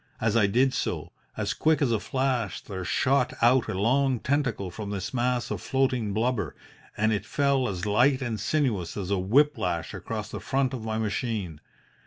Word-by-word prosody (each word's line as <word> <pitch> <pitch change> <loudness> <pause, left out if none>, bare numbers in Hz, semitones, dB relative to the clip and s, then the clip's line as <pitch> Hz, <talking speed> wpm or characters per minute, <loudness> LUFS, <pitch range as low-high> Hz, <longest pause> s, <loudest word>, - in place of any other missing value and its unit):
As 110 0 +1
I 110 -4 +5
did 125 +6 +2
so, - - -3 0.3
as - - -1
quick 160 0 +2
as 135 -5 +2
a 110 - +2
flash 130 -7 -1
there 95 -2 -6
shot 130 +7 +1
out 120 +1 +4
a - - -3
long 130 +3 +2
tentacle 125 -9 -1
from 105 +2 -6
this 100 +1 -4
mass 125 -1 0
of - - -3
floating 130 -5 0
blubber, 115 +3 -1 0.4
and 110 +1 +2
it 105 -2 -1
fell 140 +1 +1
as 90 -1 -4
light 125 +6 +3
and 120 -5 -3
sinuous 105 - 0
as 100 -1 -3
a 100 - +2
whip 135 +8 +3
lash 85 -4 -2
across - - -5
the - - -5
front 135 -1 0
of 120 -4 -5
my 110 0 -2
machine. 105 - -2
115 Hz, 190 wpm, -27 LUFS, 100-130 Hz, 0.4 s, I